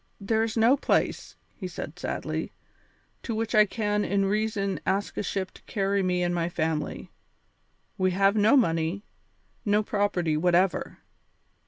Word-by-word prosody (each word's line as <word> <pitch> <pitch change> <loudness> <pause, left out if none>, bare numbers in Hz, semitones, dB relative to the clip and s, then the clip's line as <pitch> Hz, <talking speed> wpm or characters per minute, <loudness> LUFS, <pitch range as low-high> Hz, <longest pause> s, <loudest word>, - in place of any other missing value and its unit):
"There 220 +2 0
is 225 0 -1
no 230 +4 +5
place," - - 0 0.2
he 185 - -6
said 180 - -7
sadly, - - -3 0.7
"to 230 - -4
which 225 +1 -2
I 215 -1 +6
can 210 -1 -1
in 200 -1 +1
reason 205 -1 -1
ask 195 +2 -1
a - - -1
ship 190 -1 -3
to - - -17
carry 200 -1 0
me 180 -1 0
and 175 0 0
my 170 -1 0
family. 160 -3 -3 0.9
We 185 0 +3
have 195 +2 +3
no 215 +6 +5
money, 165 -3 +1 0.6
no 210 0 +2
property 200 -7 0
whatever. 175 +2 +1
200 Hz, 150 wpm, -27 LUFS, 180-215 Hz, 0.9 s, I